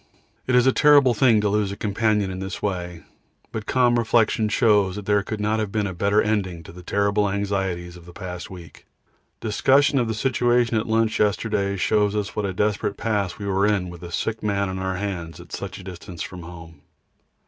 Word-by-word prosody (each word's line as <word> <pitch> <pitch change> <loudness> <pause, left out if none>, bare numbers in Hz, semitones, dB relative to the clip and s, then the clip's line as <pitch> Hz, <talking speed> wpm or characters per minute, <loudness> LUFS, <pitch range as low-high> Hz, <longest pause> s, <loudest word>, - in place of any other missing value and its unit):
It 130 - +2
is 125 0 +5
a 130 - +5
terrible 145 -3 +5
thing 115 -1 +4
to 105 - +1
lose 105 -1 0
a 100 - -6
companion 105 -2 0
in 95 - -6
this 95 -1 -5
way, 90 -4 -4 0.5
but 110 -2 -5
calm 120 -2 +3
reflection 110 -1 +2
shows 105 -4 +3
that 105 -1 -7
there 105 0 +2
could 105 +2 -5
not 105 +1 0
have 105 -2 -2
been 105 -1 0
a 95 - -3
better 100 +4 +2
ending 95 -6 -1
to - - -11
the 90 +2 -11
terrible 100 +2 +1
anxieties 95 -3 -2
of 85 -1 -14
the - - -10
past 90 0 -7
week. 85 -4 -12 0.5
Discussion 135 +6 +3
of 120 - 0
the 110 - -2
situation 120 -1 +1
at 110 - 0
lunch 110 0 +1
yesterday 100 -1 0
shows 105 +2 +1
us 105 -1 -3
what 105 - -1
a - - -2
desperate 105 +1 -1
pass 105 -5 -1
we 100 - -6
were 100 +1 +2
in 100 -4 0
with 85 -1 -11
a 85 -1 -8
sick 110 +6 -2
man 100 -2 0
on 95 0 -4
our 95 0 -2
hands 90 -4 -5
at - - -13
such - - -6
a - - -11
distance 90 -2 -8
from 90 -1 -8
home. 80 -2 -11
100 Hz, 215 wpm, -23 LUFS, 95-110 Hz, 0.5 s, is